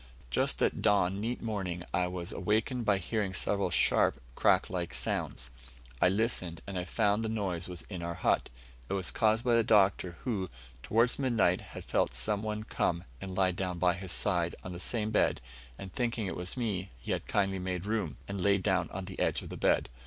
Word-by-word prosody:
Just - - +2
at - - +1
dawn 100 -2 +3
neat 120 +3 -3
morning 95 -6 -3
I 90 0 +2
was 90 -1 -4
awakened 110 +3 0
by 105 -2 +4
hearing 95 +1 -2
several 100 -1 +1
sharp, 85 - +3
crack - - +3
like 85 -5 -3
sounds. - - -2 0.5
I - - +6
listened, 95 -5 0
and 95 -2 -4
I 90 - -3
found 105 +3 +1
the 110 - -1
noise 95 -6 -2
was 90 -2 -6
in 90 -4 -7
our 85 0 -3
hut. 85 - +1 0.4
It - - -1
was 95 -3 0
caused 110 +2 +2
by 120 - +4
the 115 0 +5
Doctor, 95 -5 +3
who, 100 -8 -1 0.3
towards 115 - +2
midnight, 115 -9 +2
had - - -9
felt - - +1
some 105 -2 0
one 105 0 -3
come 85 -5 -1 0.2
and 95 -1 -5
lie 95 -1 +3
down 90 -1 -3
by 90 0 +3
his 95 -1 -5
side 85 -4 +1
on 90 - -6
the 90 - -7
same 110 +2 0
bed, 105 - +3 0.4
and, 95 -2 -8
thinking 120 -3 -1
it 95 - -3
was 90 +7 -4
me, 100 -6 -1
he - - -5
had - - -2
kindly 95 -2 +1
made 90 0 -3
room, 105 - -1
and 100 -1 -3
laid 100 0 +3
down 95 -4 +1
on 95 0 -5
the 95 0 -8
edge - - +1
of - - -8
the - - -6
bed. - - +2
95 Hz, 205 wpm, -31 LUFS, 90-110 Hz, 0.5 s, I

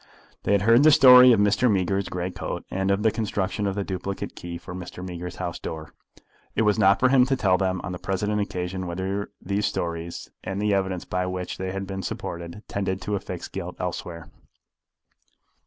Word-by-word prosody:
They 100 - +1
had 100 -1 +3
heard 115 +3 +6
the 155 - +7
story 125 -3 +9
of 115 - +4
Mr. 105 +5 +3
Meager's 95 0 0
grey 90 0 -3
coat, - - -5
and 95 0 -1
of 100 +1 +1
the 110 - +4
construction 105 -2 -2
of 95 - -2
the 100 - -1
duplicate 95 0 -4
key 85 -1 -7
for 90 +1 -9
Mr. 90 0 -7
Meager's 90 -1 -6
house - - -4
door. 80 -1 -7 0.6
It - - +2
was 105 -2 +2
not 100 +1 +5
for 130 - +4
him 130 -1 +6
to 135 - +2
tell 100 -7 +3
them 95 0 0
on 90 - -5
the 90 - -5
present 105 +2 -1
occasion 90 -1 -3
whether 95 +3 -3
these 100 +3 -1
stories, 85 0 -4
and 95 +1 -3
the 105 0 +1
evidence 95 -2 -1
by 90 0 -1
which 90 0 -4
they 95 0 -3
had 95 +1 -4
been 95 0 -5
supported, 85 +3 -6
tended 95 -1 -2
to 105 +3 -3
affix 100 - -5
guilt - - -6
elsewhere. 85 -2 -5
95 Hz, 200 wpm, -25 LUFS, 90-105 Hz, 0.6 s, story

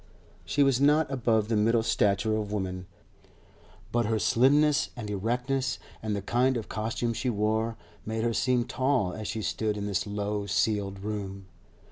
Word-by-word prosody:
She 140 +12 +2
was 135 -2 +2
not 150 +1 +4
above 115 -5 +1
the 115 - 0
middle 110 +2 +3
stature 110 0 +2
of 105 -1 -3
women, 95 -3 -3 1.0
but 120 -1 +1
her 110 0 +1
slimness 140 +7 +3
and 120 -4 -6
erectness, 125 +6 -1 0.2
and 110 -1 -2
the 100 - -4
kind 125 +4 +2
of 110 - -5
costume 115 +2 -2
she 125 +3 -2
wore 110 +1 0 0.3
made 110 0 -3
her 115 0 +1
seem 125 0 +1
tall 130 -7 0
as 110 -1 -5
she 110 +2 -3
stood 105 0 -1
in 100 - -3
this 100 -1 -1
low 105 0 -2
ceiled 100 -2 0
room. 100 -2 -5
110 Hz, 165 wpm, -28 LUFS, 105-125 Hz, 1.0 s, not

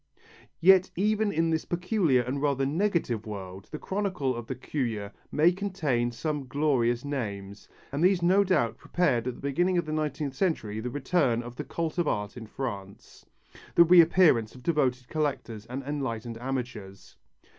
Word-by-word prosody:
Yet 185 +1 +6
even 210 +2 +1
in 165 -2 +1
this 160 -1 0
peculiar 175 - +1
and 130 +3 -3
rather 140 -2 +1
negative 155 - 0
world 95 -2 -7
the 150 - -5
chronicle 190 -9 -2
of 120 -1 -7
the 130 - -3
curieux 115 -6 -3 0.2
may 160 +4 +4
contain 165 -11 -1
some 145 +2 -3
glorious 125 -3 +1
names, 100 -8 -5 0.2
and 140 +4 -1
these 180 -1 +3
no 190 +3 +5
doubt 150 - +1
prepared 125 -9 0
at 125 - -2
the - - -14
beginning 175 +7 +1
of 170 - 0
the 155 - -4
nineteenth 150 -2 -2
century 135 - -1
the 120 +3 -3
return 130 -3 +1
of 120 0 -9
the 150 - -5
cult 165 +2 -3
of 170 - +1
art 105 -4 -2
in 115 -3 -8
France, 100 -6 -7 0.5
the 170 - +9
reappearance 165 -9 +5
of 125 - -13
devoted 130 -6 0
collectors 135 -8 -3
and 130 +3 -5
enlightened 120 -5 -4
amateurs. 120 -7 -6
140 Hz, 165 wpm, -28 LUFS, 120-170 Hz, 0.5 s, the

